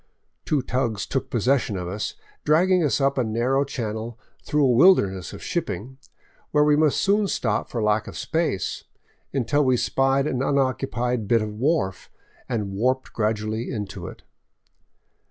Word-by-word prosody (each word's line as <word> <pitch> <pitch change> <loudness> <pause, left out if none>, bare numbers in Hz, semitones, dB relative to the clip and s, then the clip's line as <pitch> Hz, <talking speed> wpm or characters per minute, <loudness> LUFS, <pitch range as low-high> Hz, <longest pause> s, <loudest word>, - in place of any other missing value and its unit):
Two 145 -4 +1
tugs 125 -5 -1
took 135 - -3
possession 120 -2 +1
of 90 -1 -4
us, 100 +4 -4 0.3
dragging 180 +4 +3
us 145 - +1
up 140 0 +1
a - - +2
narrow 120 +5 +1
channel 115 -3 -5 0.3
through 150 -1 +2
a 130 - +4
wilderness 105 - +4
of - - -10
shipping, 130 +9 -4 0.5
where 150 0 +3
we 150 0 +4
must 150 -1 +3
soon 200 +1 +2
stop 110 - -1
for 115 -3 -2
lack 105 0 +1
of - - -8
space, 160 - -2 0.5
until 135 +3 +1
we 130 -2 +3
spied 135 +2 +1
an 130 -4 -1
unoccupied 130 -4 0
bit 115 -1 +3
of 105 -1 -5
wharf 125 - -1 0.4
and 105 -5 -2
warped 130 +6 0
gradually 110 +1 -1
into 105 -6 -5
it. - - -11
125 Hz, 155 wpm, -24 LUFS, 110-140 Hz, 0.5 s, a